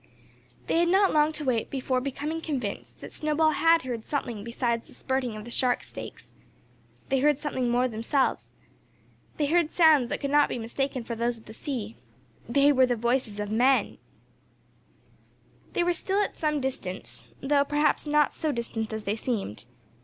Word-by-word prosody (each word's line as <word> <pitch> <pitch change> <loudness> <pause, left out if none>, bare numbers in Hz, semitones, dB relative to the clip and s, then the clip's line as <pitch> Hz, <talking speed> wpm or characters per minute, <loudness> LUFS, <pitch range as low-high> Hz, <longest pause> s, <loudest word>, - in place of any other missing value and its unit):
They 330 - +1
had 345 - +3
not 385 +2 +4
long 300 0 +4
to 300 -1 -4
wait 240 -4 0
before 260 -1 -1
becoming 290 +4 -3
convinced 255 -11 -4
that - - -8
Snowball 310 +1 +2
had 330 0 +4
heard 240 -3 -5
something 240 -7 -3
besides 235 0 -2
the - - -15
spirting 260 -4 -2
of 215 0 -8
the 240 - -9
shark 250 0 +1
steaks. - - -10 0.8
They 270 -1 +2
heard 295 +1 +3
something 260 -4 -2
more 245 +1 +2
themselves. 235 +4 -1 0.9
They 300 - +1
heard 330 +1 +2
sounds 310 -8 +5
that - - -2
could 280 -1 -3
not 295 0 +5
be - - -3
mistaken 255 +2 -2
for 235 - -5
those 235 +1 -1
of 225 - -18
the 220 - -11
sea. 230 -4 -5 0.5
They 280 +4 +5
were 260 -2 +4
the 245 - +1
voices 235 -2 -1
of 210 0 -3
Men! 255 +5 +2 1.7
They 350 - +2
were 355 0 +2
still 390 +4 0
at - - -4
some 300 -2 0
distance, 255 -9 -5
though, 280 +1 +3
perhaps, 295 +1 +1
not 295 0 +3
so 310 - -1
distant 230 -3 -3
as 220 -1 -4
they 205 +1 -1
seemed. 210 - -3
265 Hz, 175 wpm, -27 LUFS, 235-300 Hz, 1.7 s, sounds